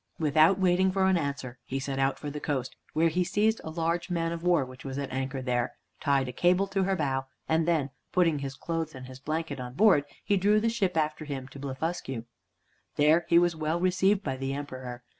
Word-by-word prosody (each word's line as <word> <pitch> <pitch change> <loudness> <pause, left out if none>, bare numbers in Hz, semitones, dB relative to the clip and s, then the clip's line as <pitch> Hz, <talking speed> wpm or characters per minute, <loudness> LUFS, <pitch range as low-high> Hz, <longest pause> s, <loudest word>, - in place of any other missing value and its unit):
Without 155 +4 +4
waiting 185 0 +3
for 190 0 +2
an 190 0 +4
answer, 140 -6 -3
he 135 - -4
set 135 0 -3
out 135 0 +1
for 145 - -5
the 150 - -5
coast, 135 -4 -2 0.2
where 165 +1 +3
he 180 +3 +1
seized 215 +5 +1
a - - -5
large 170 +2 -1
man 165 -1 0
of 170 -1 -4
war 170 -5 +3
which 130 0 -12
was 135 -1 -5
at 140 -1 -3
anchor 130 0 -3
there, 125 -1 0 0.3
tied 140 -2 +2
a - - -3
cable 180 +8 +3
to 195 -1 0
her 195 0 +1
bow, 135 -5 -1 0.2
and 160 +1 +2
then 155 -5 +1 0.2
putting 165 -5 +3
his 135 -1 -5
clothes 165 -2 -3
and 130 0 -8
his 130 0 -10
blanket 155 0 -3
on 125 0 -6
board, 185 -7 +5 0.2
he 205 - +2
drew 205 +3 +4
the 230 +2 +1
ship 195 -7 0
after 155 0 0
him 135 -3 -5
to 140 - -11
Blefuscu. 135 -3 -4 0.7
There 155 +3 +4
he 170 - +6
was 175 -1 +4
well 155 +2 -1
received 190 +3 +2
by 135 -2 -2
the 135 +1 -2
Emperor. 130 -4 -6
155 Hz, 220 wpm, -28 LUFS, 135-175 Hz, 0.7 s, he